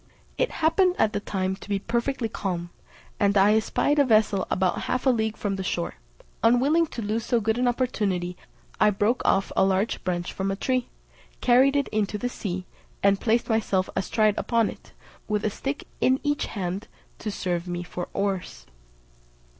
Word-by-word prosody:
It - - +1 0.2
happened 360 +3 +4
at 215 0 +2
the - - 0
time 190 -2 -2
to 205 - -13
be 200 - +1
perfectly 235 +4 -1
calm, 175 -5 -4 0.5
and 200 -1 +3
I 200 +2 +6
espied 285 +6 +1
a - - +7
vessel 215 -5 +3
about 185 -1 +1
half 255 +1 0
a 260 - +6
league 220 -2 -1
from 200 -2 -2
the 190 - -3
shore: 175 -2 -2 0.5
unwilling 275 +8 +4
to 235 - -6
lose 215 +2 -1
so 240 - +1
good 220 +2 0
an 250 - +2
opportunity, 200 -8 -1 0.4
I 210 - +6
broke 210 +4 +1
off 195 - +2
a - - +4
large 195 +3 +1
branch 175 -1 -2
from 195 0 -2
a 195 - -1
tree, 255 +4 -1 0.5
carried 260 +3 +4
it 280 -1 +2
into 210 -1 -1
the 245 +4 -2
sea, 185 -6 -4 0.4
and 200 0 +4
placed 230 +1 +2
myself 210 -5 +1
astride 215 +2 +2
upon 230 -2 +1
it, - - -15 0.4
with 210 0 -1
a 215 - +1
stick 275 +7 -4 0.2
in 260 +1 +3
each 290 -1 0
hand 190 +1 -4 0.3
to 215 - -4
serve 180 -3 -2
me 175 0 -3
for 175 0 -5
oars. 190 - -3
210 Hz, 180 wpm, -25 LUFS, 190-245 Hz, 0.5 s, a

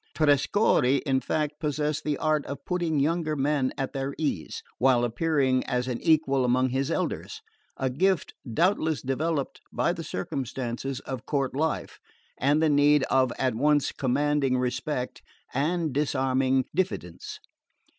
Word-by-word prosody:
Trescorre 145 - +3
in 135 -2 +2
fact 150 +1 -2
possessed 150 -1 -1
the 150 -2 -1
art 155 -2 +1
of 140 0 -7
putting 175 -4 0
younger 155 +1 0
men 140 -1 +1
at 135 - -3
their 135 0 -3
ease, 140 - -3 0.2
while 125 -1 +4
appearing 130 +1 +1
as 125 0 -1
an 125 -2 -3
equal 150 -4 +3
among 130 +1 +2
his 135 +2 -1
elders: - - -2 0.4
a 130 - 0
gift 175 +7 +1 0.2
doubtless 160 - +1
developed 140 +2 -2
by - - +1
the - - -6
circumstances 130 +4 -4
of 130 -3 -7
court 135 -3 -1
life, 155 +1 -2 0.4
and 145 +4 +3
the - - +4
need 145 0 +4
of 130 -2 +3
at 130 -1 +1
once 145 +4 +2
commanding 140 0 +1
respect 125 +1 -2 0.3
and 160 +2 0
disarming 130 -2 +1
diffidence. 170 - -3
140 Hz, 140 wpm, -27 LUFS, 130-150 Hz, 0.4 s, while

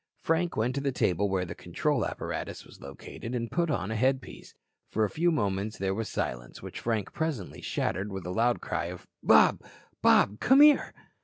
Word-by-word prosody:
Frank 165 +2 0
went 115 +3 +1
to 140 - -2
the 140 -1 0
table 100 -4 +1
where 95 -1 0
the 85 - -6
control - - -1
apparatus - - -5
was - - -16
located 70 - -8
and 115 -1 -3
put 170 -1 0
on 110 -8 -1
a - - -2
headpiece. 130 +3 -2 0.3
For 110 - 0
a 100 - -4
few 170 - +2
moments 105 -6 -1
there 95 0 -1
was 110 +2 -3
silence, - - -4
which - - -8
Frank 110 -4 -2
presently 150 - -3
shattered 100 +2 -2
with 95 -2 -6
a 90 - -3
loud 115 +5 +1
cry - - -2
of: - - -8 0.2
"Bob. - - +5 0.4
Bob. 105 +2 +4
Come 265 +2 +5
here." 300 -1 +6
110 Hz, 190 wpm, -28 LUFS, 95-140 Hz, 0.4 s, here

